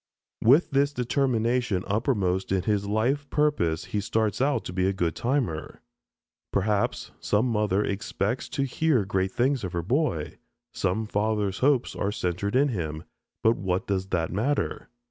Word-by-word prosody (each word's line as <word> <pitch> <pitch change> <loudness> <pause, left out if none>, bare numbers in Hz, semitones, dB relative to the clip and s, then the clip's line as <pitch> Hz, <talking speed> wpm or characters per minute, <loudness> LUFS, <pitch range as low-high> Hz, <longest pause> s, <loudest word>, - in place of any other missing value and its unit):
With 140 +9 +5
this 140 +1 +2
determination 120 -5 +1
uppermost 100 -5 0
in 95 -2 +1
his 100 -1 0
life 125 +7 0
purpose 115 - +1
he 105 - -2
starts 110 +1 0
out 140 +1 +1
to - - -5
be 95 0 +1
a 95 - +1
good 85 -4 -1
timer. 120 - -2 0.7
Perhaps 100 +1 0
some 105 +8 +1
mother 105 -3 +1
expects 100 +3 -2
to 140 -1 -1
hear 135 -4 +1
great 95 -1 0
things 130 +2 +1
of 95 -1 -4
her 85 -1 -1
boy, 120 - -1 0.3
some 95 +4 -1
father's 105 -2 0
hopes 135 -2 +2
are 100 - -1
centered 100 +2 -2
in 140 +2 +4
him, 80 - -3 0.4
but 115 +1 +4
what 95 -1 -1
does 95 -1 -1
that 85 -3 -1
matter? 135 +9 -1
105 Hz, 155 wpm, -26 LUFS, 95-125 Hz, 0.7 s, With